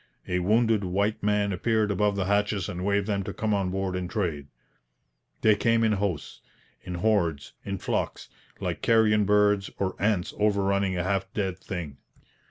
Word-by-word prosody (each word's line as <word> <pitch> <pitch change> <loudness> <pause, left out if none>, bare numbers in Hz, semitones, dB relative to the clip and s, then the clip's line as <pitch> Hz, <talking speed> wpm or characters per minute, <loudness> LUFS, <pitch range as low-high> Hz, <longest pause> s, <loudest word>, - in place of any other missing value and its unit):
A 90 - 0
wounded 110 +3 +2
white 100 +4 0
man 105 -1 +1
appeared 110 +2 +1
above 105 +1 +1
the 95 -2 -1
hatches 100 -1 +1
and 90 +1 -5
waved 100 0 +1
them 100 -2 -1
to 100 +1 -5
come 110 -4 0
on 100 -2 0
board 95 0 -2
and 90 -1 -3
trade. 85 -9 -2 0.9
They 110 -1 +5
came 115 +2 +2
in 110 - +3
hosts, 95 -8 -2 0.4
in 90 -1 -6
hordes, 85 -6 0
in 100 -1 -3
flocks, - - -3 0.3
like - - -3
carrion 110 -2 +4
birds 105 -1 +3
or 95 -1 -1
ants 100 -3 0
overrunning 100 -2 +1
a 85 - 0
half 95 +1 -1
dead 95 -3 -2
thing. 85 -8 -6
100 Hz, 170 wpm, -27 LUFS, 95-105 Hz, 0.9 s, They